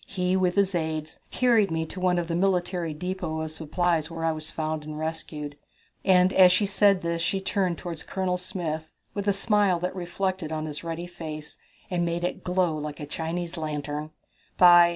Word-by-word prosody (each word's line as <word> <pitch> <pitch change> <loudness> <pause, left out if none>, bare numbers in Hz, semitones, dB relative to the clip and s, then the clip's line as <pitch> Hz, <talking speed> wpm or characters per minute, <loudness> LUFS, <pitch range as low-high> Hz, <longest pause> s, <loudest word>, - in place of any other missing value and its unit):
He, 180 -1 0
with 185 -1 +2
his 200 -1 +3
aides, 160 -2 -2
carried 230 -5 +3
me 160 0 -1
to 185 - -8
one 180 -1 +2
of 175 - 0
the 165 - -3
military 180 -2 +1
depot 165 0 -3
of 160 -1 -3
supplies, 165 0 0
where 165 -1 -4
I 165 - +3
was 155 0 -4
found 155 -1 -2
and 150 0 -6
rescued," 155 -2 -5 0.4
and 185 -1 +5
as 185 -1 +8
she 185 +3 +3
said 200 -1 +3
this 170 0 -1
she 190 +3 +1
turned 190 -3 0
toward 170 -3 -5
Colonel 185 -1 -1
Smith 165 -4 -4 0.2
with 200 0 -3
a - - +6
smile 200 -2 +3
that 180 +1 -2
reflected 185 -2 -2
on 155 0 -2
his 150 0 -5
ruddy 165 +1 -4
face 155 -3 -8 0.3
and 175 -1 +1
made 170 0 -1
it 175 - -2
glow 180 -3 +1
like 150 -1 -5
a 150 - -4
Chinese 165 +3 -4
lantern. 150 -1 -3 0.5
"By 175 -1 +8
175 Hz, 195 wpm, -27 LUFS, 155-185 Hz, 0.5 s, as